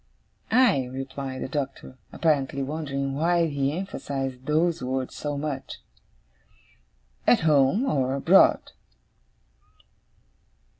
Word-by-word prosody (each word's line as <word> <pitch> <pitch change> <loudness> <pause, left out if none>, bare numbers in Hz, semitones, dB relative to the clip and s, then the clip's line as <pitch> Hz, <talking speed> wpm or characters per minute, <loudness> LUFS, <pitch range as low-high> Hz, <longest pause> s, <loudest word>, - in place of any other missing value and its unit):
'Aye!' 220 - +3
replied 135 0 -5
the - - -4
Doctor, 135 -2 -5 0.2
apparently 140 -4 0
wondering 140 -2 -3
why 170 +4 +2
he 140 -3 -1
emphasized 135 -8 -5
those 165 +2 +1
words 130 0 -3
so 145 -1 -4
much. 140 -2 -5 1.5
'At 245 - +5
home 155 - +3
or 135 - 0
abroad. 140 - +4
140 Hz, 95 wpm, -25 LUFS, 135-155 Hz, 1.5 s, At